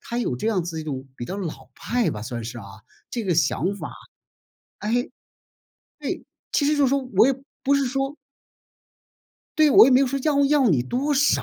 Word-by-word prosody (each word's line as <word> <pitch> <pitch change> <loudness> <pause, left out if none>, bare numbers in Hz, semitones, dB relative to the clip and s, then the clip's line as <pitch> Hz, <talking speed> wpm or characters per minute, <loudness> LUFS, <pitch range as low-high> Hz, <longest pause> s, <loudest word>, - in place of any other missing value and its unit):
他 235 - -6
有 230 - -1
这 125 - -4
样 200 -6 +1
子 165 -2 -5
一 - - -7
种 135 -3 -5
比 120 - -5
较 190 - -5
老 185 -6 -6
派 245 -1 -1
吧， 105 - -6
算 120 0 -5
是 120 +1 -6
啊， 105 - -9 0.5
这 235 -3 -3
个 180 -3 +1
想 170 +5 +1
法 - - -7 0.9
哎， 215 +2 -3 1.1
对。 - - -4 0.3
其 285 - +2
实 300 0 +2
就 290 - +2
是 - - +4
说， 280 +1 +2 0.2
我 220 +5 +7
也 - - +3 0.3
不 280 +1 +3
是 280 - +1
说 270 +3 -2 1.4
对， 310 -2 +5
我 - - +9
也 265 - +4
没 255 - +6
有 275 - +3
说 275 +2 -2
要 285 -2 +3
要 275 -4 +4
你 135 -9 +3
多 265 - -1
少！ 285 +2 +3
235 Hz, 220 characters per minute, -23 LUFS, -, 1.4 s, 我